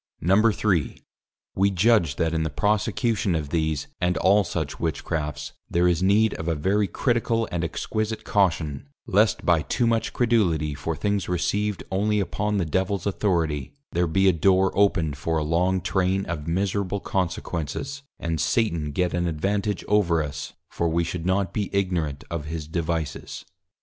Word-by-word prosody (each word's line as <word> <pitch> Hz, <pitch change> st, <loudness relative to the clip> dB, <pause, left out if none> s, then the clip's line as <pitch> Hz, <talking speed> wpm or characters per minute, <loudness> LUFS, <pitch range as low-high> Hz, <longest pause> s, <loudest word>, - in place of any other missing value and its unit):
_ 105 Hz, +2 st, +3 dB
III. -, -, -16 dB, 0.6 s
_We 100 Hz, +1 st, +3 dB
judge 95 Hz, -, +3 dB
that 80 Hz, +1 st, 0 dB
in 80 Hz, -, 0 dB
the 80 Hz, -, -1 dB
prosecution 105 Hz, 0 st, 0 dB
of 75 Hz, -3 st, -2 dB
these, 80 Hz, -2 st, 0 dB
and 90 Hz, 0 st, +1 dB
all 100 Hz, +2 st, +4 dB
such 80 Hz, -6 st, -4 dB
Witchcrafts, 80 Hz, -2 st, -3 dB, 0.2 s
there 85 Hz, +1 st, +2 dB
is 90 Hz, -1 st, +2 dB
need 105 Hz, +3 st, +3 dB
of 80 Hz, -, -5 dB
a 85 Hz, -, +1 dB
very 95 Hz, +7 st, +1 dB
critical 115 Hz, +2 st, 0 dB
and 85 Hz, -1 st, -1 dB
exquisite 110 Hz, +6 st, -2 dB
Caution, 85 Hz, -, 0 dB, 0.2 s
lest 105 Hz, -1 st, +2 dB
by 85 Hz, -3 st, +4 dB
too 95 Hz, -, 0 dB
much 115 Hz, -1 st, +1 dB
Credulity 90 Hz, -, +1 dB
for 80 Hz, +3 st, -3 dB
things 100 Hz, 0 st, -1 dB
received 100 Hz, +3 st, -1 dB
only 105 Hz, +2 st, +1 dB
upon 105 Hz, +1 st, -1 dB
the 90 Hz, -, 0 dB
Devil's 95 Hz, +3 st, -1 dB
Authority, 85 Hz, -, -1 dB, 0.2 s
there 85 Hz, +1 st, +1 dB
be 95 Hz, +4 st, +2 dB
a 95 Hz, -, +5 dB
Door 95 Hz, +3 st, +3 dB
opened 85 Hz, -7 st, +2 dB
for 80 Hz, +2 st, -1 dB
a 75 Hz, -, 0 dB
long 90 Hz, +4 st, +1 dB
Train 95 Hz, +1 st, 0 dB
of 80 Hz, -3 st, -5 dB
miserable 100 Hz, +3 st, -1 dB
Consequences, 95 Hz, -, -3 dB, 0.2 s
and 80 Hz, -3 st, -2 dB
Satan 85 Hz, -10 st, 0 dB
get 90 Hz, +2 st, 0 dB
an 85 Hz, 0 st, 0 dB
advantage 100 Hz, +5 st, -1 dB
over 90 Hz, -6 st, +3 dB
us, 70 Hz, -3 st, -6 dB, 0.2 s
for 85 Hz, -, 0 dB
we 85 Hz, +1 st, +1 dB
should 85 Hz, +1 st, -4 dB
not 95 Hz, -1 st, +1 dB
be 105 Hz, -3 st, -2 dB
ignorant 85 Hz, -7 st, -1 dB
of 85 Hz, -3 st, -3 dB
his 80 Hz, 0 st, -5 dB
Devices. 80 Hz, -2 st, -3 dB
90 Hz, 165 wpm, -25 LUFS, 80-100 Hz, 0.6 s, a